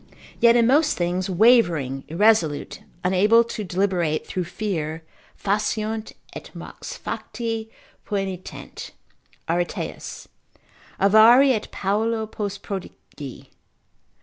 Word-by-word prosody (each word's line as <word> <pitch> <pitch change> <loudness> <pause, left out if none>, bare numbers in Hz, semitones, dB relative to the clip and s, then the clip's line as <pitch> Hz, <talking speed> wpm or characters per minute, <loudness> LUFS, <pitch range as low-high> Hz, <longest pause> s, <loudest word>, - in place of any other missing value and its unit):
Yet 235 0 +6
in 235 -1 +4
most 295 +5 +3
things 180 +2 -1
wavering, 175 - +3
irresolute, 170 -4 +1 0.2
unable 205 +6 +4
to 225 -2 -6
deliberate, 180 -4 0
through 180 -2 -3
fear, 165 -4 -4 0.3
faciunt, 215 +2 -2 0.2
et - - -9
mox - - -8
facti 225 -2 -4 0.4
poenitent 195 -3 -5 0.6
(Areteus) 175 +1 -3 0.7
avari, 230 +7 +7
et 215 - -3
paulo 220 +3 -1
post 205 -2 -5
prodigi. 160 -8 -8
200 Hz, 95 wpm, -23 LUFS, 175-225 Hz, 0.7 s, avari